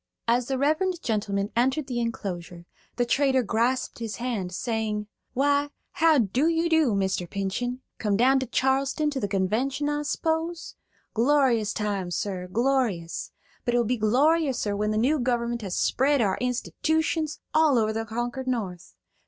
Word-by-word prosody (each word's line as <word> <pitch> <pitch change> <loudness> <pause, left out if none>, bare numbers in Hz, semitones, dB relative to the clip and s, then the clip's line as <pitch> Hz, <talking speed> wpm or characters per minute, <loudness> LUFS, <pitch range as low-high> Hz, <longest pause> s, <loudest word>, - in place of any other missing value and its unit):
As 240 +1 +2
the 270 - -1
reverend 315 +6 +1
gentleman 205 -2 -1
entered 265 +5 +1
the 250 -3 -3
enclosure, 180 -7 -4 0.3
the 245 - +1
trader 265 +1 +2
grasped 235 +5 0
his 225 -2 -4
hand, 230 -7 -3
saying: 215 +1 -2 0.3
"Why, 285 +2 +2 0.2
how 325 -3 +4
do 250 - +2
you 335 0 +1
do, 320 -8 +3
Mr. 190 -3 -1
Pinchen? 240 +6 -3 0.2
Come 205 -2 +1
down 265 +4 +4
to 260 - -3
Charleston 270 +4 +1
to 275 - -2
the 205 - -1
Convention, 235 +9 0
I 295 0 -1
s'pose? 320 +3 -2 0.4
Glorious 240 -3 +3
time, 205 -4 -2
sir, 180 0 -3
glorious; 230 -8 0 0.3
but 240 - 0
it - - +4
will 240 - +2
be 245 +1 0
gloriouser 260 -1 +2
when 210 +1 0
the 215 - 0
new 275 +7 +2
government 240 -1 -1
has 190 -4 -4
spread 280 +2 +2
our 200 -5 +1
institootions 310 +5 -1
all 310 -4 +4
over 220 -1 +1
the 225 +1 -2
conquered 240 +3 -4
North. 195 - -3
245 Hz, 160 wpm, -26 LUFS, 210-280 Hz, 0.4 s, how